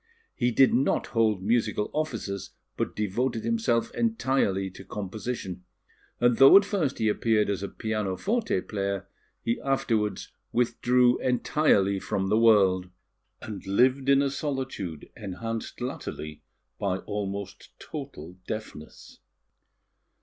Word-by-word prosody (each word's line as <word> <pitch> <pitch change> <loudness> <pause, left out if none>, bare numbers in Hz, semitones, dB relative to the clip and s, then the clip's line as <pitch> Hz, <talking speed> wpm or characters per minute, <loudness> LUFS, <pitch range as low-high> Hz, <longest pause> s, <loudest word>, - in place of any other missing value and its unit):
He 120 - +1
did 130 +2 +4
not 130 +3 +2
hold 110 -5 +2
musical 110 -1 0
offices, 115 -11 -3 0.2
but - - -3
devoted 110 +3 -1
himself 225 - 0
entirely 130 - 0
to - - -11
composition; 100 -2 -5 0.6
and 120 -1 +3
though 135 +7 +9
at 200 - +4
first 185 -9 -1
he 110 - +1
appeared 105 0 +2
as 100 - -2
a 100 - -4
pianoforte 110 - -1
player, 100 -1 -3 0.4
he 115 - -1
afterwards 115 -6 0 0.2
withdrew 125 +1 +3
entirely 120 -6 +2
from 95 0 -2
the 105 +2 +3
world, 95 -5 +4 0.5
and 105 -3 -7
lived 130 +7 +3
in 140 0 +5
a 140 - 0
solitude 130 - -4
enhanced 115 +2 -5
latterly 75 -10 -5 0.4
by 95 -2 0
almost 100 -1 -5
total 110 - -8
deafness. 110 -8 -8
110 Hz, 120 wpm, -27 LUFS, 100-130 Hz, 0.6 s, though